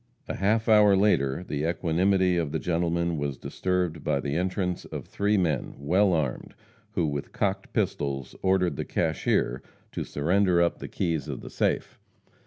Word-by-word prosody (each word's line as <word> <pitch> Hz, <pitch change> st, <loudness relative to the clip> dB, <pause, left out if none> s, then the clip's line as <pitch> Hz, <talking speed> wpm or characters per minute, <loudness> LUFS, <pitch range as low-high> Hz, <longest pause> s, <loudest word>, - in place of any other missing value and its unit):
A -, -, -3 dB
half 110 Hz, +3 st, +1 dB
hour 105 Hz, -2 st, +6 dB
later 90 Hz, -7 st, +2 dB
the 75 Hz, -4 st, -3 dB
equanimity 90 Hz, +2 st, +2 dB
of 80 Hz, -4 st, -1 dB
the 80 Hz, -, 0 dB
gentlemen 85 Hz, -1 st, 0 dB
was 70 Hz, -2 st, -2 dB
disturbed 90 Hz, 0 st, -2 dB
by 70 Hz, -, +1 dB
the 70 Hz, +1 st, -3 dB
entrance 90 Hz, +1 st, -1 dB
of -, -, -7 dB
three 105 Hz, +1 st, 0 dB
men, 80 Hz, -7 st, 0 dB
well 90 Hz, +8 st, +2 dB
armed, 75 Hz, -6 st, -2 dB, 0.4 s
who, 85 Hz, -, +1 dB
with 70 Hz, -2 st, -3 dB
cocked 95 Hz, -1 st, -1 dB
pistols, 70 Hz, -2 st, -2 dB
ordered 95 Hz, -2 st, +2 dB
the -, -, -2 dB
cashier 65 Hz, +2 st, 0 dB, 0.3 s
to -, -, -3 dB
surrender 90 Hz, +4 st, +2 dB
up 85 Hz, 0 st, +2 dB
the -, -, -6 dB
keys 80 Hz, -6 st, -2 dB
of -, -, -5 dB
the -, -, -9 dB
safe. -, -, -1 dB
85 Hz, 165 wpm, -27 LUFS, 75-95 Hz, 0.4 s, hour